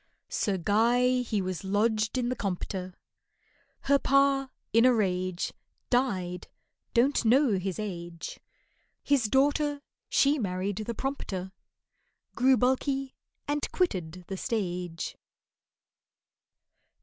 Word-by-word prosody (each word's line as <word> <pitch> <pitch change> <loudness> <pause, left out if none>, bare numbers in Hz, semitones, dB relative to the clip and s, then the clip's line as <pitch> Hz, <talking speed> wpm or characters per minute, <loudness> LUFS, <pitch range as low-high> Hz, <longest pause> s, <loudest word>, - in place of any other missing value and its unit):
SIR 200 -2 0
GUY 240 +7 +3
he 215 -5 -1
was 185 -1 -4
lodged 215 +3 +1
in 245 -1 0
the 255 - -1
Compter, 185 -2 -4 0.9
Her 280 0 +3
pa, 275 0 +3 0.2
in 230 +1 +6
a 255 - +7
rage, 185 -5 0 0.4
Died 185 -9 0 0.5
(don't 255 +4 +3
know 235 -3 +4
his 185 -1 -3
age), 175 -5 -6 0.6
His 280 -5 +2
daughter, 285 +4 +2 0.3
she 280 +2 +3
married 190 -1 -2
the 220 +2 -4
prompter, 195 -9 -4 0.8
Grew 260 +1 +4
bulky 265 +2 0 0.3
and 290 0 -1
quitted 180 - -1
the 195 - -4
stage. 180 -7 -3
220 Hz, 105 wpm, -28 LUFS, 185-265 Hz, 0.9 s, a